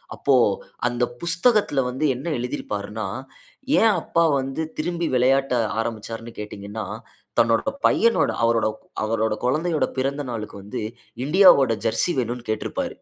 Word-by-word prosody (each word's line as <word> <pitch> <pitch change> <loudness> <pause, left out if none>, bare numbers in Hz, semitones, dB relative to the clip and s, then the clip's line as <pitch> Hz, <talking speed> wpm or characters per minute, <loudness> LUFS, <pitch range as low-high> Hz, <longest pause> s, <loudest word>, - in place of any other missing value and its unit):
அப்போ, 140 - +1 0.5
அந்த 120 0 +1 0.2
புஸ்தகத்தில 180 - +3
வந்து 130 +5 -3
என்ன 130 +6 -8
எழுதியிருப்பாருன்னா, 110 -4 -4 0.7
ஏன் 225 0 +5
அப்பா 170 0 +1
வந்து 135 +4 -3
திரும்பி 170 +1 -2
விளையாட்ட 135 +2 +3 0.3
ஆரம்பிச்சாருன்னு 115 0 -5
கேட்டீங்கன்னா, 105 0 -6 0.6
தன்னோட 115 - +2 0.2
பையனோட, 230 +1 +3
அவரோட 115 -1 +3 0.4
அவரோட 110 0 0
குழந்தையோட 155 +5 +1
பிறந்த 140 +2 -1
நாளுக்கு 105 -3 -6
வந்து, 105 - -5 0.4
இண்டியாவோட 150 - +6
"ஜெர்சி" 175 +9 +2
வேணுன்னு 120 -1 -4
கேட்ருப்பாரு 110 - -3
125 Hz, 115 wpm, -23 LUFS, 115-155 Hz, 0.7 s, இண்டியாவோட